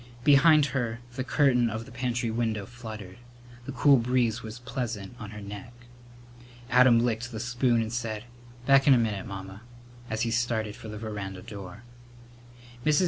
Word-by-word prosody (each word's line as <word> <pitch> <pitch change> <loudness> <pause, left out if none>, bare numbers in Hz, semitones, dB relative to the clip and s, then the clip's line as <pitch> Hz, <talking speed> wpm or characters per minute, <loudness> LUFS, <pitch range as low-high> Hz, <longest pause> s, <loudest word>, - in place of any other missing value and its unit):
Behind 150 +1 +6
her 120 -5 -2 0.2
the 130 - -2
curtain 130 -4 +3
of 110 +1 -5
the - - -13
pantry 120 -1 -1
window 110 -3 -1
fluttered. 110 -6 -9 0.5
The - - -3
cool 140 +2 +5
breeze 120 -1 +1
was 110 +1 -8
pleasant 120 -4 -5
on 105 - -7
her 105 0 -8
neck. 100 +3 -8 1.0
Adam 125 0 +6
licked 120 +1 -2
the 110 - -5
spoon 125 0 +1
and 110 +1 -5
said, 110 -3 -3 0.4
"Back 135 +1 +5
in 135 - +8
a - - +4
minute, 110 -5 -1
Mamma," 95 +1 -8 0.5
as 110 0 -2
he 115 - -1
started 115 -3 0
for - - -10
the 105 0 -6
veranda 100 -4 -6
door. 100 -1 -9 1.0
Mrs. 155 0 +4
115 Hz, 165 wpm, -28 LUFS, 110-125 Hz, 1.0 s, in